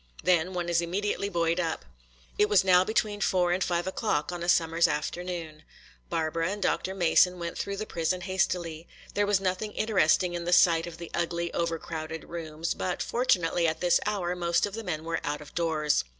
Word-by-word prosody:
Then 180 Hz, 0 st, +2 dB
one 175 Hz, -1 st, -2 dB
is 170 Hz, 0 st, +2 dB
immediately 200 Hz, +3 st, -2 dB
buoyed 170 Hz, -2 st, 0 dB
up. 165 Hz, -, -2 dB, 0.5 s
It 210 Hz, 0 st, +4 dB
was 200 Hz, -3 st, +5 dB
now 180 Hz, -1 st, +5 dB
between 210 Hz, 0 st, -1 dB
four 180 Hz, -3 st, +2 dB
and 185 Hz, +1 st, +1 dB
five 175 Hz, -1 st, -1 dB
o'clock 190 Hz, -5 st, -1 dB
on 175 Hz, -1 st, -5 dB
a 175 Hz, -, -2 dB
summer's 165 Hz, 0 st, +3 dB
afternoon. 165 Hz, 0 st, -4 dB, 0.5 s
Barbara 165 Hz, +1 st, -1 dB
and 205 Hz, +1 st, -4 dB
Dr. 190 Hz, 0 st, -1 dB
Mason 180 Hz, 0 st, +4 dB
went 170 Hz, -1 st, -5 dB
through 200 Hz, 0 st, -3 dB
the 215 Hz, -, -3 dB
prison 170 Hz, -1 st, -1 dB
hastily. 175 Hz, -3 st, -2 dB, 0.3 s
There 205 Hz, 0 st, +1 dB
was 205 Hz, -2 st, +3 dB
nothing 195 Hz, +2 st, -2 dB
interesting 185 Hz, -4 st, +2 dB
in 170 Hz, -1 st, -4 dB
the 175 Hz, -, +1 dB
sight 170 Hz, -1 st, +5 dB
of 170 Hz, -1 st, -8 dB
the 170 Hz, 0 st, -9 dB
ugly, 170 Hz, 0 st, -2 dB
over 170 Hz, -1 st, -1 dB
crowded 160 Hz, 0 st, -6 dB
rooms; 165 Hz, -1 st, -4 dB
but 180 Hz, -, -3 dB
fortunately 175 Hz, -8 st, +1 dB
at 160 Hz, -, -1 dB
this 175 Hz, -1 st, +3 dB
hour 185 Hz, -4 st, -1 dB
most 170 Hz, -1 st, +1 dB
of 205 Hz, -, -7 dB
the 225 Hz, +1 st, -5 dB
men 160 Hz, -5 st, -3 dB
were 165 Hz, 0 st, -2 dB
out 145 Hz, 0 st, -2 dB
of 150 Hz, -, -13 dB
doors. 160 Hz, -3 st, +1 dB
175 Hz, 195 wpm, -28 LUFS, 165-185 Hz, 0.5 s, was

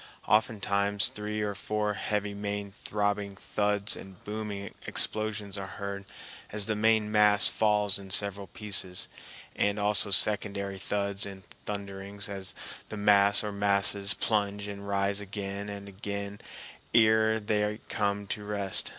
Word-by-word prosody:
Oftentimes 100 Hz, -2 st, +1 dB
three 105 Hz, 0 st, -4 dB
or 105 Hz, -1 st, -2 dB
four 105 Hz, +1 st, -2 dB
heavy 105 Hz, 0 st, -2 dB
main 100 Hz, 0 st, -4 dB
throbbing 100 Hz, 0 st, -2 dB
thuds 105 Hz, +1 st, -1 dB
and 95 Hz, -2 st, -12 dB
booming 105 Hz, -1 st, -5 dB
explosions 105 Hz, -2 st, +1 dB
are 95 Hz, -, -5 dB
heard 100 Hz, 0 st, -5 dB, 0.5 s
as 105 Hz, -1 st, -2 dB
the 110 Hz, -, -1 dB
main 110 Hz, 0 st, +2 dB
mass 105 Hz, -2 st, +5 dB
falls 105 Hz, -2 st, +2 dB
in 95 Hz, -1 st, -11 dB
several 100 Hz, +1 st, +1 dB
pieces, 100 Hz, -4 st, 0 dB, 0.5 s
and 105 Hz, 0 st, +1 dB
also 105 Hz, 0 st, +5 dB
secondary 100 Hz, 0 st, +4 dB
thuds 100 Hz, +1 st, -1 dB
and 95 Hz, -1 st, -10 dB, 0.2 s
thunderings 100 Hz, 0 st, -4 dB
as 95 Hz, -3 st, -5 dB, 0.3 s
the 110 Hz, -, -6 dB
mass 100 Hz, 0 st, +5 dB
or 105 Hz, -, -3 dB
masses 100 Hz, 0 st, +2 dB
plunge 100 Hz, -2 st, -1 dB
and 100 Hz, 0 st, -7 dB
rise 100 Hz, 0 st, 0 dB
again 100 Hz, 0 st, -5 dB
and 100 Hz, 0 st, -7 dB
again 100 Hz, +1 st, -6 dB, 0.5 s
ere 110 Hz, 0 st, +5 dB
they 105 Hz, 0 st, -1 dB
come 100 Hz, -1 st, -1 dB
to 105 Hz, +1 st, -5 dB
rest. 100 Hz, -2 st, +1 dB
100 Hz, 135 wpm, -29 LUFS, 100-105 Hz, 0.5 s, mass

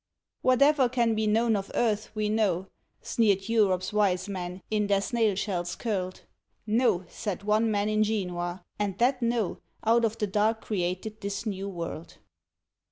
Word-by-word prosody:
Whatever 265 Hz, +1 st, +4 dB
can 235 Hz, -2 st, +2 dB
be 215 Hz, 0 st, 0 dB
known 225 Hz, +1 st, +3 dB
of 195 Hz, -1 st, -3 dB
earth 215 Hz, -2 st, +1 dB
we 215 Hz, 0 st, 0 dB
know, 205 Hz, -4 st, +1 dB, 0.4 s
Sneered 200 Hz, -4 st, +2 dB
Europe's 200 Hz, -5 st, +2 dB
wise 200 Hz, -3 st, +2 dB
men, 180 Hz, -2 st, -5 dB
in 210 Hz, -1 st, +1 dB
their 200 Hz, -1 st, +3 dB
snail 220 Hz, 0 st, +1 dB
shells 180 Hz, -3 st, -2 dB
curled; 185 Hz, -5 st, -3 dB, 0.4 s
No! 215 Hz, -5 st, +2 dB
said 200 Hz, -2 st, -5 dB
one 215 Hz, +2 st, +2 dB
man 205 Hz, -1 st, +1 dB
in 215 Hz, 0 st, +2 dB
Genoa, 180 Hz, -4 st, -2 dB, 0.2 s
and 200 Hz, -3 st, -1 dB
that 255 Hz, +2 st, +2 dB
No 235 Hz, -4 st, 0 dB, 0.2 s
Out 230 Hz, +1 st, +4 dB
of 225 Hz, 0 st, 0 dB
the 210 Hz, -, 0 dB
dark 210 Hz, +3 st, +1 dB
created 190 Hz, +2 st, -3 dB
this 200 Hz, +2 st, -4 dB
New 200 Hz, -2 st, -3 dB
World. 170 Hz, -3 st, -6 dB
210 Hz, 160 wpm, -28 LUFS, 190-225 Hz, 0.4 s, Whatever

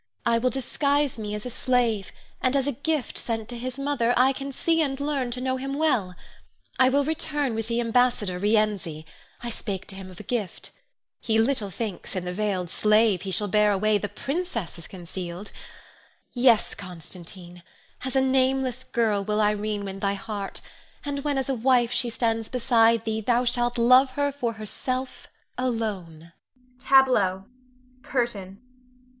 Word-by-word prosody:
I 230 Hz, 0 st, +3 dB
will 255 Hz, +2 st, +2 dB
disguise 280 Hz, +1 st, 0 dB
me 210 Hz, -1 st, -3 dB
as 210 Hz, -, -6 dB
a 250 Hz, -, -4 dB
slave, 235 Hz, -5 st, +1 dB, 0.3 s
and 255 Hz, +1 st, +2 dB
as 270 Hz, -2 st, +2 dB
a 285 Hz, -, +1 dB
gift 285 Hz, +1 st, -2 dB
sent 225 Hz, -2 st, -2 dB
to 245 Hz, -, -5 dB
his 255 Hz, +1 st, -5 dB
mother, 275 Hz, -4 st, +1 dB
I 260 Hz, +2 st, +5 dB
can 275 Hz, +1 st, -5 dB
see 325 Hz, +4 st, +1 dB
and 275 Hz, -3 st, -1 dB
learn 280 Hz, -3 st, -1 dB
to 245 Hz, +1 st, -4 dB
know 260 Hz, 0 st, 0 dB
him 270 Hz, +1 st, -4 dB
well. 245 Hz, -12 st, +1 dB, 0.6 s
I 255 Hz, 0 st, +6 dB
will 280 Hz, +1 st, +2 dB
return 295 Hz, -4 st, -1 dB
with 225 Hz, 0 st, -3 dB
the 235 Hz, 0 st, 0 dB
ambassador, 230 Hz, -6 st, +1 dB
Rienzi. 205 Hz, -7 st, 0 dB, 0.4 s
I 240 Hz, -, -3 dB
spake 200 Hz, -4 st, -5 dB
to 195 Hz, -, -5 dB
him 190 Hz, -1 st, -8 dB
of 185 Hz, -, -12 dB
a -, -, -8 dB
gift. 215 Hz, -8 st, -3 dB, 0.5 s
He 220 Hz, -1 st, +1 dB
little 225 Hz, -3 st, +2 dB
thinks 200 Hz, -1 st, -5 dB
in 180 Hz, -1 st, -3 dB
the 180 Hz, -, -3 dB
veiled 190 Hz, -3 st, -1 dB
slave 215 Hz, -3 st, +3 dB
he 195 Hz, -, -5 dB
shall 205 Hz, +2 st, +1 dB
bear 210 Hz, +1 st, +4 dB
away, 210 Hz, +1 st, +2 dB
the 205 Hz, -, -3 dB
princess 255 Hz, -, -4 dB
is 165 Hz, -, -9 dB
concealed. 180 Hz, +1 st, -7 dB, 0.8 s
Yes, 245 Hz, -3 st, +4 dB
Constantine, 175 Hz, 0 st, -9 dB, 0.4 s
as 260 Hz, +1 st, -4 dB
a 265 Hz, -, +5 dB
nameless 260 Hz, -1 st, +1 dB
girl 220 Hz, -5 st, +1 dB
will 210 Hz, +1 st, 0 dB
Irene 210 Hz, -1 st, 0 dB
win 195 Hz, 0 st, -6 dB
thy 200 Hz, 0 st, 0 dB
heart; 200 Hz, 0 st, -5 dB, 0.4 s
and 280 Hz, -1 st, -3 dB
when 290 Hz, -2 st, 0 dB
as 265 Hz, -, -1 dB
a 270 Hz, -, +1 dB
wife 245 Hz, -1 st, +3 dB
she 245 Hz, -, 0 dB
stands 225 Hz, -1 st, -1 dB
beside 230 Hz, -2 st, +3 dB
thee, 220 Hz, 0 st, -1 dB
thou 240 Hz, +2 st, +2 dB
shalt 240 Hz, 0 st, +1 dB
love 255 Hz, +3 st, +6 dB
her 285 Hz, 0 st, +1 dB
for 245 Hz, -5 st, -2 dB
herself 255 Hz, +4 st, -4 dB, 0.3 s
alone. 195 Hz, -10 st, -3 dB, 0.5 s
[Tableau. 245 Hz, -9 st, +4 dB, 0.6 s
CURTAIN. 210 Hz, -8 st, -2 dB
230 Hz, 170 wpm, -26 LUFS, 205-260 Hz, 0.8 s, I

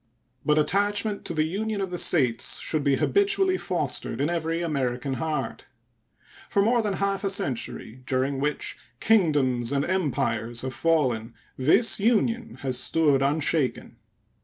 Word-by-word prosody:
But 150 Hz, 0 st, +2 dB
attachment 205 Hz, +5 st, 0 dB
to -, -, -2 dB
the 155 Hz, -, +2 dB
Union 205 Hz, +6 st, -2 dB
of 190 Hz, -2 st, -3 dB
the 175 Hz, -, -3 dB
States 125 Hz, -8 st, +1 dB
should 155 Hz, -2 st, -2 dB
be 140 Hz, -1 st, +3 dB
habitually 395 Hz, -, +2 dB
fostered -, -, -2 dB
in 145 Hz, +4 st, 0 dB
every 165 Hz, 0 st, -1 dB
American 135 Hz, -4 st, -2 dB
heart. 160 Hz, -1 st, -3 dB, 0.8 s
For -, -, 0 dB
more 235 Hz, +2 st, +3 dB
than 210 Hz, -2 st, -1 dB
half 195 Hz, +1 st, -1 dB
a 195 Hz, -, +1 dB
century, 130 Hz, -, -3 dB
during 135 Hz, +1 st, 0 dB
which 150 Hz, +1 st, -2 dB, 0.2 s
kingdoms 145 Hz, -, +2 dB
and 140 Hz, 0 st, 0 dB
empires 120 Hz, -, -1 dB
have 130 Hz, 0 st, -4 dB
fallen, 125 Hz, -7 st, 0 dB, 0.2 s
this 195 Hz, -, +3 dB
Union 230 Hz, +1 st, +1 dB
has 130 Hz, -2 st, -1 dB
stood 145 Hz, -2 st, +2 dB
unshaken. 145 Hz, 0 st, 0 dB
155 Hz, 140 wpm, -25 LUFS, 130-200 Hz, 0.8 s, be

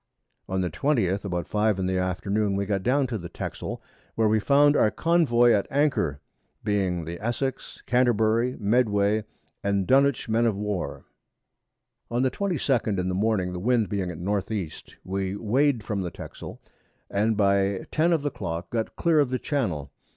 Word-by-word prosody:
On 95 Hz, 0 st, 0 dB
the 90 Hz, -, -1 dB
20th, 100 Hz, -, 0 dB
about 90 Hz, -3 st, -3 dB
5 105 Hz, -1 st, +1 dB
in 95 Hz, -, -1 dB
the 95 Hz, 0 st, 0 dB
Afternoon, 100 Hz, +3 st, 0 dB
we 100 Hz, 0 st, -1 dB
got 100 Hz, -1 st, -1 dB
down 135 Hz, +6 st, +2 dB
to 120 Hz, -4 st, -3 dB
the 85 Hz, -1 st, -8 dB
Texel, -, -, -6 dB, 0.3 s
where 110 Hz, -1 st, +3 dB
we 110 Hz, +1 st, +3 dB
found 145 Hz, +5 st, +4 dB
our 110 Hz, -, +4 dB
Convoy 135 Hz, -7 st, +3 dB
at 100 Hz, -3 st, +2 dB
Anchor, 135 Hz, -, +1 dB, 0.4 s
being 95 Hz, -5 st, 0 dB
the 85 Hz, +2 st, -6 dB
Essex, 130 Hz, +3 st, -3 dB
Canterbury, 120 Hz, 0 st, +2 dB
Medway, 105 Hz, -1 st, +2 dB, 0.4 s
and 100 Hz, -1 st, +1 dB
Dunwich 135 Hz, +1 st, +3 dB
Men 115 Hz, +1 st, +2 dB
of 105 Hz, -4 st, 0 dB
War. 105 Hz, -2 st, -3 dB, 1.0 s
On 120 Hz, +2 st, 0 dB
the 130 Hz, -, +2 dB
22d 135 Hz, -, 0 dB
in 90 Hz, 0 st, -1 dB
the -, -, -1 dB
Morning, 95 Hz, -2 st, 0 dB
the 90 Hz, -, -4 dB
Wind 115 Hz, +1 st, +1 dB
being 95 Hz, -3 st, -2 dB
at 85 Hz, -, -6 dB
N. 100 Hz, +4 st, 0 dB
E. 100 Hz, -8 st, -2 dB, 0.3 s
we 95 Hz, 0 st, -2 dB
weigh'd 120 Hz, +3 st, +1 dB
from 105 Hz, -2 st, -2 dB
the 90 Hz, -, -3 dB
Texel, -, -, -9 dB, 0.5 s
and 110 Hz, +2 st, 0 dB
by 100 Hz, -1 st, +2 dB
10 165 Hz, +3 st, +2 dB
of 160 Hz, -4 st, +1 dB
the 145 Hz, -, -1 dB
Clock 85 Hz, -3 st, -5 dB
got 115 Hz, -2 st, -2 dB
clear 165 Hz, -2 st, +3 dB
of 140 Hz, -3 st, +3 dB
the 130 Hz, -, 0 dB
Channel. 110 Hz, -, -2 dB
105 Hz, 175 wpm, -26 LUFS, 95-125 Hz, 1.0 s, found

